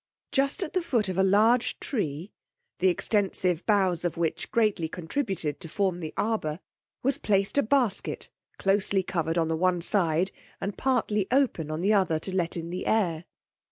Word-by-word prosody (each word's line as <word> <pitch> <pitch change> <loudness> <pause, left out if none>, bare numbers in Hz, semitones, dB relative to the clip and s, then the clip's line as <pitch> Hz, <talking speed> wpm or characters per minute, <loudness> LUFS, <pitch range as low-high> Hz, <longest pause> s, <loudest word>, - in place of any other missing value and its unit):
Just 275 0 +1
at - - -6
the 370 - +1
foot 235 - 0
of 185 - -3
a - - +5
large 220 +5 +3
tree, 175 - -3 0.5
the 190 - +3
extensive 185 -2 0
boughs 190 -5 +2
of 175 -2 -2
which 165 -2 -2
greatly 210 -8 +1
contributed 175 - -3
to 165 - -8
form 185 0 0
the 160 -3 -5
arbour, 195 -8 -1 0.4
was 270 +2 +1
placed 195 -1 +2
a - - +6
basket 240 -5 0 0.3
closely 195 0 +1
covered 165 -3 -1
on 165 -1 +2
the 160 - 0
one 180 +1 +2
side, 180 -2 +2 0.3
and 200 0 -3
partly 220 -6 0
open 245 - +1
on 155 +1 -3
the 205 +4 +3
other 185 -6 +2
to 185 +4 -6
let 175 -2 -1
in 170 0 -5
the 180 - -4
air. 175 -7 +1
190 Hz, 175 wpm, -27 LUFS, 170-215 Hz, 0.5 s, a